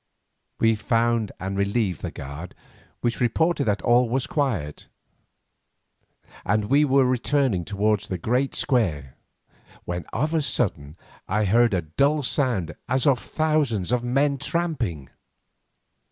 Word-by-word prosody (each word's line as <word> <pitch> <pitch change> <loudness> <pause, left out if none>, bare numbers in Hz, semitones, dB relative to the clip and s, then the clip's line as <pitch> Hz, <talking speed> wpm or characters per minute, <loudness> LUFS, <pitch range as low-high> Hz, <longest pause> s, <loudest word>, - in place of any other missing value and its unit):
We 115 0 +3
found 115 0 0
and 95 +1 -4
relieved 100 -2 0
the - - -3
guard, 70 +6 -8 0.5
which 120 -1 -1
reported 145 +5 +1
that 105 -1 0
all 120 0 +4
was 130 +3 0
quiet, 130 - -2 1.6
and 105 +2 0
we 145 +2 +5
were 135 -2 +4
returning 125 -5 +1
towards 105 0 0
the 95 - -3
great 125 +9 0
square 80 - 0 0.7
when 90 -2 -4
of 150 +7 -1
a 160 - +2
sudden 80 - -2 0.3
I 105 +3 +1
heard 115 +1 +3
a 90 - -1
dull 140 - +1
sound 120 - 0 0.2
as 130 +2 +2
of 135 -4 +4
thousands 150 - 0
of 125 -1 +1
men 140 +3 +1
tramping. 130 - -2
120 Hz, 130 wpm, -24 LUFS, 95-140 Hz, 1.6 s, we